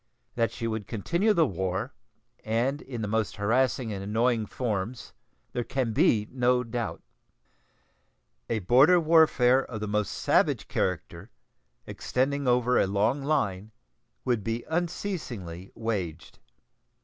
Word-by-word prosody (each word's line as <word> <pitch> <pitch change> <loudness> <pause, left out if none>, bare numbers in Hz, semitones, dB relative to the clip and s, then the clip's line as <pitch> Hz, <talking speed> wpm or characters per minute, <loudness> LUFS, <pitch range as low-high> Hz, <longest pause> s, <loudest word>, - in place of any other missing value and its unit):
That 115 -1 0
she 115 - -5
would 110 -3 -3
continue 170 - +1
the 170 -6 +4
war, 95 - -3 0.5
and 120 +6 0
in 120 -4 -6
the - - -2
most 110 0 -1
harassing 115 +2 +1
and 95 -1 -5
annoying 110 +2 +1
forms, 115 0 -4 0.4
there 120 - -1
can 125 -2 -2
be 115 - +3
no 125 0 +2
doubt. 115 -1 -4 1.5
A 115 - +1
border 140 - +6
warfare 155 -6 +4
of 115 -4 -7
the 105 - -3
most 105 0 -1
savage - - +1
character, 90 +2 -3 0.6
extending 140 +2 -1
over 125 0 +3
a - - +3
long 105 +8 +1
line, 110 -9 -1 0.6
would 120 -5 0
be 115 +2 -3
unceasingly 155 - -4
waged. 95 -8 -4
115 Hz, 125 wpm, -27 LUFS, 105-130 Hz, 1.5 s, border